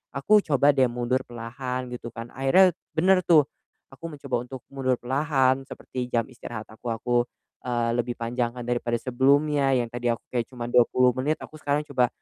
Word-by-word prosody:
Aku 205 +10 +4
coba 145 -1 +4
deh 130 -1 +5
mundur 125 +2 0
perlahan, 125 +2 -5
gitu 120 -1 -6
kan. 115 +1 -7
Akhirnya 175 +7 +5 0.2
bener 185 +3 +4
tuh. 155 -5 +6 0.5
Aku 165 +3 -7
mencoba 135 -4 -3
untuk 130 +1 -8
mundur 130 -2 0
perlahan 135 0 +1
seperti 125 -1 -6
jam 115 -2 +1
istirahat 120 -3 -8
aku 120 - -10
aku, 120 +2 -2 0.5
eee, 120 -2 0
lebih 120 0 -1
panjangkan 120 +1 -2
daripada 120 -1 -1
sebelumnya, 140 +2 +2
yang 120 -2 0
tadi 120 0 -3
aku 115 -4 -4
kayak 120 -1 0
cuma 120 -2 -6
20 125 +1 +4
menit 145 +5 0
aku 155 - -10
sekarang 145 +1 0
coba 125 -3 +2
125 Hz, 170 wpm, -25 LUFS, 120-140 Hz, 0.5 s, tuh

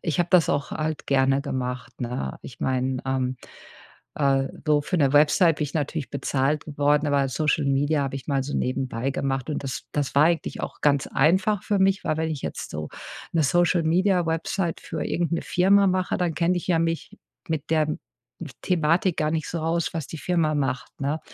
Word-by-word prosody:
ich 160 -2 -1
habe 175 - +2
das 180 -3 +5
auch 145 0 -1
halt 155 0 -3
gerne 135 0 +3
gemacht, 130 -3 -5
ne? 120 - -4
Ich - - -11
meine, 130 0 0
ähm, 130 -1 -1 0.8
äh, 135 -2 +2 0.2
so 150 -1 +4
für 180 - -2
'ne 140 -2 +3
Website 155 +3 +5
bin 150 - -1
ich 145 - -7
natürlich 150 -1 -2
bezahlt 140 +1 0
geworden, 145 0 +1
aber 140 -1 +2
Social-Media 145 0 +1
habe 135 0 -3
ich 135 - -9
mal 140 -2 +1
so 145 - -3
nebenbei 130 0 -1
gemacht 135 -1 -2
und 145 - -3
das 130 - -4
das 145 -2 -2
war 145 +2 +6
eigentlich 170 0 0
auch - - -6
ganz 140 -2 +3
einfach 190 +8 +2
für 205 - +1
mich, 195 0 +2
weil 155 - 0
wenn 160 0 -1
ich 145 -4 -4
jetzt - - -5
so 75 0 -5 0.4
'ne 165 -2 +2
Social-Media 175 +3 +2
Website 165 +2 -1
für 160 - -5
irgend 170 -1 -1
'ne 170 - 0
Firma 195 +2 +4
mache, 185 0 0
dann 175 -3 0
kenne 175 +1 +1
ich 175 - -4
ja 170 - +3
mich 165 -1 -2 0.3
mit 160 -1 -3
der 155 -1 +2 0.7
Thematik 170 +1 +1
gar 155 0 +1
nicht 160 -1 -2
so 170 - -3
aus, 165 +2 -1
was 160 -4 -3
die 160 - -7
Firma 165 -3 +1
macht, 135 0 -3
ne? 145 +3 -1
150 Hz, 195 wpm, -25 LUFS, 135-170 Hz, 0.8 s, war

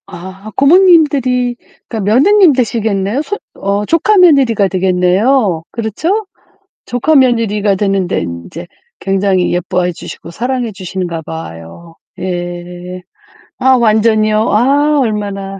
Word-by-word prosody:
아 190 +4 -10
고모님들이 280 -7 +3 0.3
그러니까 225 - -5
며느님 370 - +5
되시겠네요? 220 -2 -1
손 410 +6 -4 0.2
어 200 +1 -2
조카 335 - +2
며느리가 270 - +4
되겠네요. 185 +2 +1
그렇죠? 320 - -2 0.6
조카 245 +6 0
며느리가 225 -6 +2
되는데 195 -2 -1
인제 85 - -7 0.3
굉장히 195 -1 0
예뻐해 180 0 -1
주시고 170 - -10
사랑해 245 +5 -3
주시는가 185 -3 -5
봐요. 160 - -10 0.2
예. 175 0 -6 0.6
아 265 - +2
완전히요. 215 -1 +2 0.2
아 285 +6 +2
얼마나 200 -4 -3
210 Hz, 275 characters per minute, -13 LUFS, 185-255 Hz, 0.6 s, 며느님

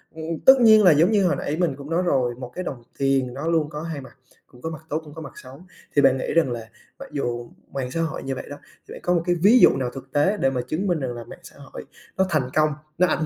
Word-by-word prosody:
ừm, 160 - -7 0.2
tất 265 - +11
nhiên 220 -2 +7
là 180 - +7
giống 165 +7 +4
như 200 -3 +3
hồi - - +1
nãy 150 - -3
mình 170 -7 +1
cũng 140 +2 -10
nói 175 +2 +1
rồi, 125 -7 +1
một 125 -1 -9
cái 185 - -4
đồng 125 -7 -6 0.2
tiền 135 -2 +1
nó 145 +4 -5
luôn 160 -3 +1
có 150 0 -6
hai 160 -4 -5
mặt, 130 - -15 0.3
cũng 125 -1 -19
có 160 - -4
mặt 160 -1 -8
tốt, 155 - -1
cũng 150 -1 -13
có 160 - -9
mặt 145 - -8
xấu. 135 +5 -12 0.3
Thì 145 - +5
bạn 135 -1 +4
nghĩ - - -3
rằng 160 -7 +2
là 115 -2 -6 0.3
mặc 275 - -9
dù 120 -3 -4 0.2
mạng 130 -2 -3
xã 165 - -1
hội 160 -1 -3
như 135 0 -3
vậy - - -7
đó, 145 - -7 0.3
thì - - -13
bạn - - -8
có 180 - +2
một 170 - +2
cái 175 0 +2
ví 205 +9 +5
dụ - - +8
nào 125 -2 -2
thực 135 0 -10
tế 190 +9 +2
để 135 - +2
mà 125 -2 -2
chứng 185 +8 -2
minh 175 -4 +1
rằng 130 -3 -3
là 120 -1 -7
mạng - - -12
xã - - -14
hội - - -10 0.3
nó 190 - +3
thành 135 -6 0
công, 155 0 +3 0.3
nó 180 +1 +4
ảnh 155 - 0
150 Hz, 300 wpm, -23 LUFS, 130-170 Hz, 0.3 s, tất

